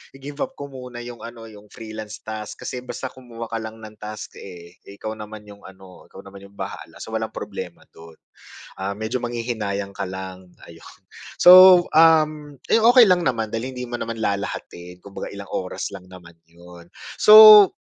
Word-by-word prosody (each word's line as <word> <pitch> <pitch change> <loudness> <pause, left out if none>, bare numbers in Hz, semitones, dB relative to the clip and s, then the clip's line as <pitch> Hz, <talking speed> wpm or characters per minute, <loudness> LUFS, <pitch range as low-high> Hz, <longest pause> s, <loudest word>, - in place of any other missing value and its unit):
i-give-up 145 - -7
ko 140 0 -9
muna 125 -2 -9
'yong 120 -1 -10
ano, 115 -1 -11
'yong 105 0 -16
freelance 110 -1 -10
task 110 -1 -8
kasi 125 - -5
basta 125 +1 -7
kumuha 115 -3 -11
ka 115 - -3
lang 110 0 -8
ng 110 0 -11
task, 105 0 -9
eh. 85 -2 -12 0.2
Ikaw 110 +2 -6
naman 105 0 -10
'yong 100 -1 -15
ano, 95 -1 -16
ikaw 95 - -14
naman 100 0 -13
'yong 100 - -24
bahala. - - -8
So, - - -10
walang - - -4
problema - - -8
do'n. 80 0 -15 0.7
Ah, 100 +1 -4
medyo 110 +4 -4
manghihinayang 110 -5 -4
ka 100 -1 -5
lang, 95 -1 -9 0.2
ayun. 85 0 -16 0.4
So, 185 0 +8
um, 155 -2 +3 0.2
ayun, 225 - +3
okey 245 -1 +8
lang 180 -3 +3
naman 115 -4 -1
dahil 125 +4 -5
hindi 125 - -6
mo 120 0 -6
naman 115 0 -5
lalahatin, 90 -3 -5
kumbaga 100 0 -9
ilang 100 0 -10
oras 90 - -5
lang 90 - -11
naman 85 -2 -16
'yon. 85 +1 -16 0.3
So, 215 -1 +10
110 Hz, 175 wpm, -21 LUFS, 100-130 Hz, 0.7 s, So